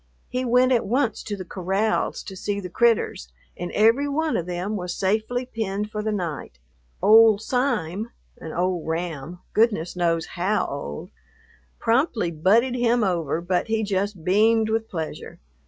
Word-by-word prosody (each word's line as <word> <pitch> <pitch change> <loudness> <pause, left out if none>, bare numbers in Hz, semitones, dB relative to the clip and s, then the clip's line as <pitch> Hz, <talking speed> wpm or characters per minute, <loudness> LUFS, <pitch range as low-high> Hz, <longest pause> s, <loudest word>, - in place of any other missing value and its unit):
He 250 +1 -2
went 250 +1 +3
at 235 -5 +2
once 240 -1 0
to 205 -2 -5
the 185 - -7
corrals 195 +5 -1
to 190 - -8
see 200 +2 -3
the 180 -3 -7
"critters," 225 - +1 0.2
and 175 0 -5
every 230 +7 +4
one 315 +2 0
of 170 - -2
them 180 +4 -3
was 180 -3 -4
safely 220 +6 0
penned 210 -3 -3
for 210 - -3
the 215 0 -1
night. 170 - -4 0.5
"Old 220 -1 +7
Sime," 225 - -1 0.3
an 160 - -7
old 180 -1 -1
ram 165 0 -4
(goodness 210 -7 +1
knows 170 -2 +1
how 190 +4 0
old!), 75 - -6 0.7
promptly 230 - +1
butted 210 +11 +3
him 240 -1 +2
over, 170 -5 0
but 180 +3 0
he 220 0 0
just 200 -3 -2
beamed 220 +3 +3
with 225 0 -1
pleasure. 160 -3 -6
205 Hz, 155 wpm, -24 LUFS, 175-225 Hz, 0.7 s, Old